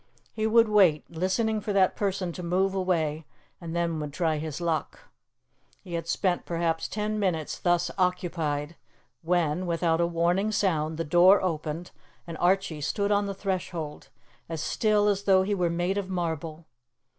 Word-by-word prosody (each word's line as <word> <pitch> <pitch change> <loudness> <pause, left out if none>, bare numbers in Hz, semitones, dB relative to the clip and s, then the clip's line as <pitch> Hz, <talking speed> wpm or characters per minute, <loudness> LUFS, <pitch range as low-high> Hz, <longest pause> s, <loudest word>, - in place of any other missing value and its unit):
He 220 0 -1
would 230 +1 +5
wait, 190 -8 +4
listening 190 +6 0
for 205 0 -3
that 190 -2 +3
person 195 -3 -1
to 180 - -7
move 185 +3 +1
away, 165 -5 -1 0.3
and 165 -1 -6
then 170 -2 0
would 150 -1 -4
try 160 0 0
his 155 0 -5
luck. 165 -3 -2 0.8
He 180 -3 -9
had 165 0 -3
spent 180 0 0
perhaps 165 -1 -1
ten 215 +1 -2
minutes 170 -6 -1
thus 175 -1 +1
occupied 170 -4 -1 0.5
when, 175 0 0
without 165 -1 +1
a 170 - +2
warning 175 +5 +1
sound, 160 -6 0
the 165 - -1
door 175 +5 +6
opened 165 -1 -3 0.3
and 170 -1 -7
Archie 180 -4 +1
stood 200 +7 -1
on 205 0 +2
the 195 - -4
threshold, 180 -6 -4 0.4
as 165 -1 -4
still 210 -1 +2
as 200 -1 0
though 190 -1 +5
he 205 +2 -1
were 180 -3 +1
made 175 +4 0
of 190 -2 -5
marble. 165 -3 -3
175 Hz, 165 wpm, -27 LUFS, 165-195 Hz, 0.8 s, door